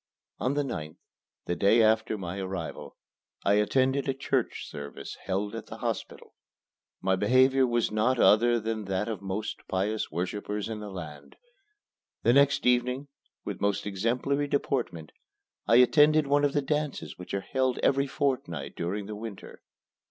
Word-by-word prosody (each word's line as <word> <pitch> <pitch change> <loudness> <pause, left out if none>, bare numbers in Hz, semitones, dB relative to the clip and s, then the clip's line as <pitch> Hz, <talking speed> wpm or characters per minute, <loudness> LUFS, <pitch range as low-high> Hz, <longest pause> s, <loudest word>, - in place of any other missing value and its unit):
On 130 +6 0
the 145 - +1
9th, 80 - -5 0.5
the 85 - -1
day 100 +6 +4
after 110 0 +2
my 95 0 -5
arrival, 95 -6 -5 0.5
I 100 - +4
attended 130 +5 +1
a 135 - 0
church 135 - -1
service 70 -1 -8
held 100 +2 -2
at 115 -1 -7
the - - -8
hospital. - - -5 0.7
My 95 - +2
behavior 130 +6 +4
was 120 -2 +1
not 115 +4 +2
other 120 +2 +5
than 110 -1 -3
that 95 +2 -1
of 110 -4 -3
the 100 - -14
most 105 +3 -3
pious 105 +3 -1
worshipper 95 +5 -3
in 105 +1 -4
the 105 -1 -7
land. 80 -6 -9 0.9
The 120 - +5
next 140 +1 +4
evening, 125 +3 +1 0.4
with - - -5
most 100 0 0
exemplary 120 +8 0
deportment, 125 - -2 0.6
I 115 - +5
attended 150 +5 +6
one 145 +1 +2
of 140 - 0
the 145 - +1
dances 150 -5 -3
which 90 +2 -5
are 100 - -1
held 130 +3 0
every 140 +1 +3
fortnight 85 - -2
during 100 +4 -3
the 105 +1 -6
winter. 105 -2 -9
110 Hz, 160 wpm, -28 LUFS, 95-130 Hz, 0.9 s, attended